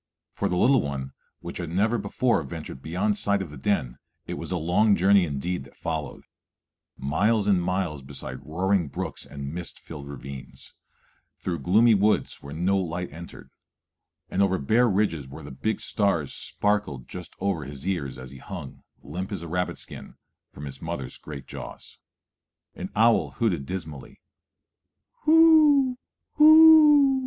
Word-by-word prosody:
For - - -1
the 90 - -1
little 130 +6 +4
one, 70 -2 -5 0.3
which - - -7
had 85 -2 -4
never 110 +7 +1
before 115 +5 +1
ventured 65 -1 -8
beyond 95 +7 -1
sight 100 -1 +1
of 85 - -10
the - - -9
den, 65 -4 -1 0.3
it - - -5
was - - -6
a 90 - 0
long 90 +6 +3
journey 95 +1 +4
indeed 75 +2 -3
that 70 - -17
followed, 80 -4 -5 0.7
miles 100 +10 +1
and 95 -3 +3
miles 90 -5 -2
beside 70 +1 -8
roaring 90 +2 0
brooks 80 +1 -6
and 70 0 -7
mist 85 0 -6
filled 75 -3 -10
ravines, 70 -1 -9 0.6
through 85 -3 -3
gloomy 110 - +4
woods 105 +1 +1
where 70 - -10
no 95 +4 +1
light 90 -2 -4
entered, 85 +2 -11 0.8
and 95 - -1
over 95 -1 +2
bare 115 - +3
ridges 95 -9 0
where 70 - -10
the 70 - -9
big 110 +12 -2
stars 100 -9 0
sparkled 100 -11 -1
just 90 -1 -9
over 95 -7 -1
his 70 +3 -8
ears 80 -9 -2
as 65 0 -10
he 70 - -11
hung, 85 -6 -9 0.2
limp 90 +8 -6
as 95 -5 -4
a - - -6
rabbit 90 +2 -2
skin, - - -8 0.4
from 75 - -9
his 70 -1 -8
mother's - - -5
great 70 -4 -9
jaws. - - -10 0.7
An - - -6
owl 115 +1 +3
hooted 85 - 0
dismally, 80 -6 -7 1.1
_whoo 305 -5 +6 0.4
hooo! 300 -3 +8
90 Hz, 155 wpm, -25 LUFS, 70-105 Hz, 1.1 s, hooo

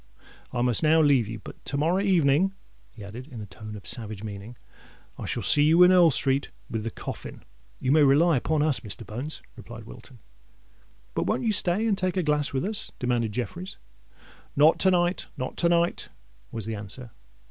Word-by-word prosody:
I 120 -1 -1
must 125 -3 +3
now 160 +1 +4
leave 140 -7 +3
you: 110 +1 -6
but 105 - -12
to 140 - -2
morrow 165 +6 +1
evening," 185 -1 +2 0.3
he 105 - -12
added, 115 +6 -9
in 125 -6 -10
a 105 - -6
tone 105 +2 -10
of 100 - -11
savage 110 -4 -4
meaning, 105 +3 -8 0.6
"I - - -5
shall - - -2
see 145 - +6
you 160 +4 +6
in 180 - +7
Earl 180 -2 +6
Street 135 -1 +2 0.2
with 110 -2 -3
the 115 - -2
coffin!" - - -8 0.4
"You 130 - 0
may 155 +1 +5
rely 150 +4 +4
upon 150 +4 0
us, 150 -4 +1
Mr. 110 +1 -7
Bones," 130 +8 -6
replied - - -10
Wilton. - - -13 1.0
"But - - -1
won't - - 0
you 225 - +2
stay 200 +1 +1
and 215 -3 +2
take 185 0 -2
a 185 - +1
glass 150 -2 0
with 135 +5 -2
us?" 215 +1 -4
demanded 120 -3 -1
Jeffreys. 175 - -5 0.8
"Not 150 +3 +5
to 190 - +4
night—not 175 -7 -1
to 170 - +2
night," 170 0 +1 0.4
was 110 -3 -5
the 110 - -4
answer. 110 +4 -8
140 Hz, 190 wpm, -26 LUFS, 115-175 Hz, 1.0 s, in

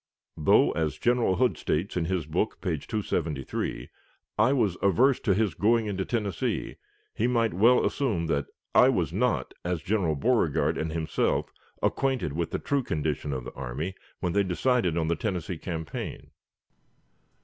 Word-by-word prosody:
Though, 75 - +4
as 75 -2 -1
General 120 -2 +2
Hood 125 +2 +1
states 85 +6 -1
in 85 -2 0
his 90 -2 -1
book, 85 +8 -1
page 80 -7 -3
273, 75 - -2 0.5
I - - +4
was 110 -10 +2
"averse 120 +8 +4
to 95 - +1
his 105 -4 +1
going 115 +6 +2
into 95 -2 -2
Tennessee," 105 -7 -2 0.4
he 115 - 0
might 115 -2 +1
well 115 +8 +5
assume 110 -12 0
that 70 -3 -1 0.3
I - - +7
"was - - 0
not, - - 0
as 90 -2 -2
General 95 -7 +1
Beauregard 80 - +2
and 80 0 -2
himself, 80 0 -1 0.3
acquainted 130 - 0
with 85 +1 -2
the - - -2
true 140 -1 0
condition 75 - -2
of 65 -2 -3
the - - -8
army" 70 +8 -4 0.3
when 90 -2 -1
they 100 - +3
decided 95 -1 +1
on 80 -1 0
the 85 - +1
Tennessee 90 -5 -3
campaign. 80 -3 -5
90 Hz, 160 wpm, -27 LUFS, 80-110 Hz, 0.5 s, I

